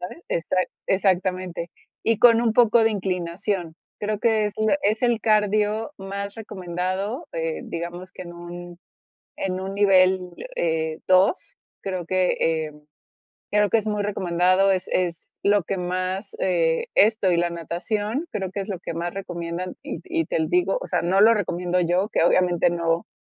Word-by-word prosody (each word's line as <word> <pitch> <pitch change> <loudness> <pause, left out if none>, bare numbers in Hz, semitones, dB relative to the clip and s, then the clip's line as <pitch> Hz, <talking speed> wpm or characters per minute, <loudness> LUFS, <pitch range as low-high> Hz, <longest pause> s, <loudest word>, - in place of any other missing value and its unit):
¿sabes? 185 - -8
Exa 170 +2 -1 0.3
exactamente. 185 -2 0 0.3
Y 230 -2 +2
con 235 -1 +6
un 225 -2 +2
poco 235 -1 +5
de 225 - +4
inclinación, 180 -2 -2 0.2
creo 210 0 -2
que 220 -2 +3
es 210 - -2
la 215 +5 +3
es 215 +4 +1
el 240 -3 +2
cardio 215 +2 +2
más 200 +1 -5
recomendado 190 - -4
eh, 165 -1 -3
digamos 175 +2 -6
que - - -8
en 175 -1 -10
un 175 0 -9 0.6
en 185 -1 -2
un 195 +1 -5
nivel, 190 -2 +4 0.4
eh, 160 -1 -1
2 185 - +3 0.2
creo 185 -3 -4
que, 185 +1 +1
eh, 160 -1 0 0.8
creo 210 -1 +3
que 230 - +4
es 220 - -4
muy 210 -1 0
recomendado, 185 0 +2
es 185 -1 -2
es 175 -2 -1
lo 205 -1 +4
que 195 +4 -3
más, 185 +2 -3
eh, 165 -3 +1
esto 210 -2 +4
y 175 - +3
la 175 0 +1
natación, 205 - -3
creo 190 -2 -3
que 200 - -4
es 200 - -10
lo 190 -4 -4
que 170 - -5
más 170 +2 -3
recomiendan 175 -1 -5
y - - -5
y 335 -2 -1
te - - -2
l 160 -1 0
digo, 180 +2 +2
o - - -5
sea, 175 -2 0
no 185 +3 +2
lo 225 +2 +7
recomiendo 180 -2 -1
yo, 180 +3 +1
que 190 - +1
obviamente 175 -1 +3
no 170 0 0
185 Hz, 175 wpm, -24 LUFS, 175-210 Hz, 0.8 s, lo